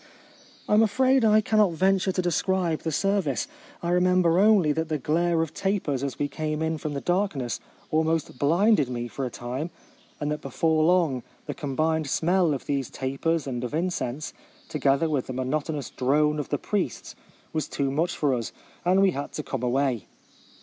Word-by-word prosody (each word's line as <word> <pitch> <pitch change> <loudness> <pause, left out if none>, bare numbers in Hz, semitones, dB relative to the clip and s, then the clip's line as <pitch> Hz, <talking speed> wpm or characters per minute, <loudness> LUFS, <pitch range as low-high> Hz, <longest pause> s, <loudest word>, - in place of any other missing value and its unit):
I - - +1
am 210 - +6
afraid 255 +4 +3
I 215 0 +5
cannot 210 -4 +3
venture 190 +2 +2
to 185 0 -1
describe 175 -1 0
the 160 - -2
ser 195 +5 +1
vice. 145 - -2 0.4
I 170 - 0
remember 180 -1 +3
only 200 -7 +5
that 160 +2 -2
the 155 - 0
glare 165 +4 +1
of 160 -1 -6
tapers 190 -9 -1
as 140 -2 -3
we 145 - 0
came 155 +2 -3
in 160 -1 -1
from 150 -1 -4
the 140 - -3
darkness 175 - -1 0.3
almost 160 -4 0
blinded 170 - +3
me 120 -1 -3
for 135 +2 -4
a - - -5
time; 125 +7 -5 0.5
and 150 0 -2
that 150 - -3
before 160 -2 +1
long, 165 -7 +2 0.2
the - - -4
combined 155 +1 -1
smell 175 +2 +2
of 135 - -7
these 140 -3 -1
tapers 140 +4 -1
and 125 -3 -4
of 125 +4 -3
incense, 155 -5 -2 0.4
together 140 +1 +2
with 145 -5 -1
the 130 - -4
mo 130 +1 -2
notonous 145 +1 -2
drone 150 +3 +2
of 145 - -4
the - - 0
priests, - - -3 0.4
was 155 -3 -1
too 135 -1 -1
much 170 +5 0
for 145 -3 +2
us, 115 -3 -2 0.3
and 185 +2 +4
we 195 - +4
had 140 -3 -5
to 150 - -4
come 135 -3 -4
away. 125 -3 0
155 Hz, 190 wpm, -26 LUFS, 140-180 Hz, 0.5 s, am